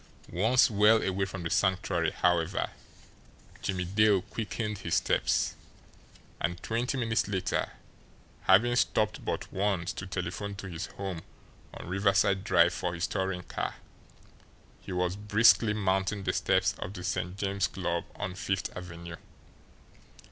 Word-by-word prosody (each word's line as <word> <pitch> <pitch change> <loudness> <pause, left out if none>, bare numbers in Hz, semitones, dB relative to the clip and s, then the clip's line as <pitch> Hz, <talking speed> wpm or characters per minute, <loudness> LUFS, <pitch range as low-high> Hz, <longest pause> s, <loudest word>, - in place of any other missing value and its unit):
Once 110 +8 +4
well 105 +2 +5
away 95 0 0
from 95 -2 -6
the 80 - -2
Sanctuary, 90 -4 +1
however, 85 -2 +1 0.9
Jimmie 90 -2 -2
Dale 100 0 +3
quickened 105 -1 -4
his 85 -3 -1
steps; - - +1 0.9
and 85 +1 -1
twenty 120 +4 -1
minutes 115 -3 +1
later, 95 -3 -1 0.7
having 110 +6 +5
stopped - - +1
but - - -4
once 95 -2 0
to 95 - -6
telephone 95 +3 -4
to 100 - -8
his 85 -3 -5
home 95 -4 -5 0.5
on - - -9
Riverside 95 0 +2
Drive 85 -5 +4
for 90 -1 -2
his 85 - -1
touring 95 -1 -2
car, - - -4 1.0
he - - -9
was 90 0 0
briskly 105 +2 +4
mounting 95 0 0
the 90 -1 0
steps - - +2
of 95 - -5
the 90 -3 -7
St. 90 +1 -2
James 100 0 0
Club 85 -2 -2
on 90 - -4
Fifth 95 +2 -2
Avenue. 85 -2 -8
95 Hz, 135 wpm, -29 LUFS, 90-105 Hz, 1.0 s, well